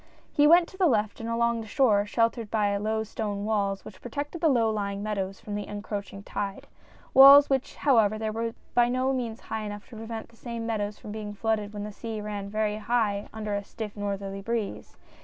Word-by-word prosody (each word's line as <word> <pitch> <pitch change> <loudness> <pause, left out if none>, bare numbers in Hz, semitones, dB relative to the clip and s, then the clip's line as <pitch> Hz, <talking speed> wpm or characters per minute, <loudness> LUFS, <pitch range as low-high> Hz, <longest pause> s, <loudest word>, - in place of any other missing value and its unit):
" - - -31
He 295 0 +5
went 340 +2 +7
to 375 - -14
the 375 -2 +4
left 215 -6 +1
and 225 0 -4
along 235 0 +1
the 220 - -8
shore, 210 -3 +3
sheltered 230 0 0
by 205 -2 +1
the 200 - 0
low 220 0 0
stone 205 -2 -4
walls 200 -2 0
which 185 - -11
protected 290 +7 -5
the 325 - +4
low 235 -5 +3
lying 200 -1 -3
meadows 195 -2 -3
from 210 - -7
the 205 0 -3
encroaching 205 -1 -6
tide 200 -1 -4 0.5
walls 280 +1 +9
which, 265 -1 0
however, 220 -4 +2
were 230 +1 -3 0.2
by 240 0 +4
no 255 +2 +1
means 235 -3 -3
high 220 - -4
enough 205 -1 -6
to 240 - -11
prevent 225 0 -6
these 230 - -22
same 235 -2 -5
meadows 210 -2 -2
from 210 - -9
being 210 -1 -6
flooded 215 -1 -1
when 205 -1 -5
the 210 - -5
sea 220 +1 -6
'ran 205 -1 -5
very 215 0 -1
high 215 -2 0
under 215 -1 -4
a 200 0 -1
stiff 210 +1 -7
northerly 200 -1 -4
breeze. 225 -1 -4
215 Hz, 215 wpm, -27 LUFS, 205-230 Hz, 0.5 s, walls